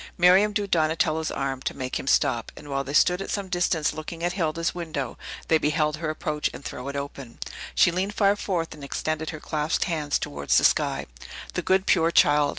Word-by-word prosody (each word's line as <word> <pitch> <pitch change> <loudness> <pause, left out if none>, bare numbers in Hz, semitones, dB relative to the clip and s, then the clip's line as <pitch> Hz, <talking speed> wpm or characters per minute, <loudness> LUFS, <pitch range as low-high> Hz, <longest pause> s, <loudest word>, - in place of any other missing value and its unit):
Miriam 185 +4 +6
drew 205 -1 -1
Donatello's 160 -3 +1
arm, 135 -1 -3
to - - -4
make 130 -1 -3
him - - -7
stop, 115 -3 +2
and 145 - -11
while 135 0 0
they 140 - -6
stood 180 +5 +4
at - - -5
some 200 -2 -3
distance 175 -3 +1
looking 165 +2 -7
at 175 0 0
Hilda's 165 -2 -1
window, 160 -7 -4 0.3
they 160 - +4
beheld 150 0 +1
her 160 0 -3
approach 150 -1 -2
and - - -10
throw 125 - -6
it 140 - -4
open. 140 -3 -6 0.4
She - - +5
leaned 190 +4 -2
far 200 -1 +4
forth, 175 -5 -2
and 145 - -12
extended 155 +3 -2
her 155 - -6
clasped 150 0 -1
hands 155 -5 0
towards 70 0 0
the - - +4
sky. - - +2 0.5
"The - - -1
good, 190 0 +2
pure 165 -2 +4
child! 145 -3 +4
155 Hz, 205 wpm, -25 LUFS, 145-175 Hz, 0.5 s, Miriam